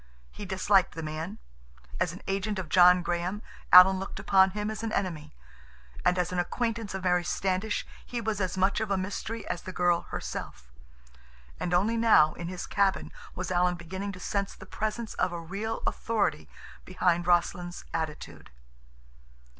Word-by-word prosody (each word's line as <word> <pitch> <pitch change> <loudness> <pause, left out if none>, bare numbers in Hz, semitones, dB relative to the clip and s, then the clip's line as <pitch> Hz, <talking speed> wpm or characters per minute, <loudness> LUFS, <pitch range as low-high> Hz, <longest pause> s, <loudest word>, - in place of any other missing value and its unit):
He - - -8
disliked 190 -1 +2
the 165 - -5
man. 160 +7 -5 0.6
As 170 - +1
an 180 - -11
agent 195 +2 -2
of 180 -4 -5
John 180 0 +6
Graham 175 +4 -2 0.3
Alan 185 +1 +9
looked 195 0 -6
upon 195 -1 +4
him 210 +2 -3
as 220 - -6
an 225 -1 -3
enemy, 160 -8 -3 0.7
and 180 - +3
as 180 -1 0
an 180 - -1
acquaintance 225 +2 -2
of 190 - -5
Mary 180 -1 +2
Standish 190 +4 -1 0.2
he 245 - -5
was 220 -3 -2
as 185 0 -2
much 190 +2 +2
of 220 -1 -2
a 195 - +1
mystery 205 +4 -4
as 175 - -3
the 185 - -7
girl 175 -1 +1
herself. 60 -1 -6 0.9
And 175 - -2
only 205 +6 +2
now, 220 -9 +5
in 170 - -6
his 180 0 -5
cabin, 200 -1 0 0.2
was 185 0 -4
Alan 180 0 +2
beginning 190 +4 -5
to 185 - -10
sense 200 +1 -2
the - - -12
presence 215 +1 -4
of 185 - 0
a 175 - -4
real 200 +7 -4
authority 205 -9 -1 0.3
behind 180 -2 0
Rossland's 175 0 0
attitude. 160 -2 -5
185 Hz, 170 wpm, -28 LUFS, 175-205 Hz, 0.9 s, Alan